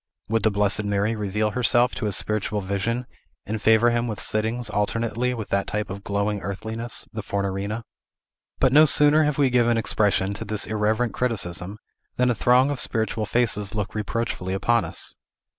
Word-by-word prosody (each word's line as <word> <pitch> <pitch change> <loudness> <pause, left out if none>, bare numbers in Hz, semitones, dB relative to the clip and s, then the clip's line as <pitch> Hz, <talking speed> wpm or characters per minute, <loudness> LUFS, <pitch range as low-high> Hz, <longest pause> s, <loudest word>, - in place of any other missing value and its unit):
Would 115 0 +1
the 110 - +3
Blessed 105 +1 +1
Mary 105 +2 0
reveal 105 +1 -1
herself 120 +1 +3
to 110 - -4
his 105 -2 +1
spiritual 105 0 0
vision, 100 +6 -2 0.4
and 110 0 -4
favor 110 +2 +4
him 120 0 0
with 110 -3 -4
sittings 110 +3 -2
alternately 115 +4 -1
with 110 -3 -6
that 100 0 0
type 105 -2 -3
of 100 +1 -7
glowing 100 0 -1
earthliness, 110 +5 -4
the 110 - -4
Fornarina? 100 +2 -3 0.8
But 130 -1 +3
no 155 +2 +8
sooner 150 +1 +4
have 150 -2 -1
we 140 -3 +3
given 120 -1 +3
expression 100 -3 +2
to 100 - -5
this 105 0 0
irreverent 110 +2 0
criticism, 100 -5 -1 0.4
than 125 0 +2
a - - +2
throng 125 +4 +3
of 140 - -4
spiritual 110 -1 -1
faces 105 -4 0
look 105 -2 -3
reproachfully 105 -3 -3
upon 115 +3 +1
us. - - -3
110 Hz, 175 wpm, -24 LUFS, 100-120 Hz, 0.8 s, no